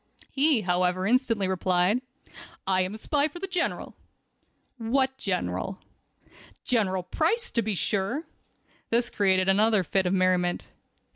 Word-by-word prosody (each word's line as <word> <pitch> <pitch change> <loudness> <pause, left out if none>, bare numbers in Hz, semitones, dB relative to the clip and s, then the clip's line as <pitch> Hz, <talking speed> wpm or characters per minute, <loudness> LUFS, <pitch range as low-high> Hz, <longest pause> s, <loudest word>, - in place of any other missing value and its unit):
He, 280 -3 +2
however, 180 0 +1
instantly 230 -3 +2
replied: 185 +4 +1 0.6
"I 185 -1 +2
am 185 +3 -2
a - - -7
spy 290 +6 +1
for 310 - -11
the 370 - -4
General." 360 -2 -2 0.8
"What 260 +3 +1
General?" 180 - -2 0.9
"General 190 -7 0
Price, 335 - 0
to 235 - +1
be 215 -2 -2
sure." 205 - -1 0.6
This 235 +1 +1
created 190 -2 +2
another 210 +1 +3
fit 190 +3 0
of 180 - 0
merriment. 185 -1 +1
200 Hz, 130 wpm, -26 LUFS, 185-255 Hz, 0.9 s, another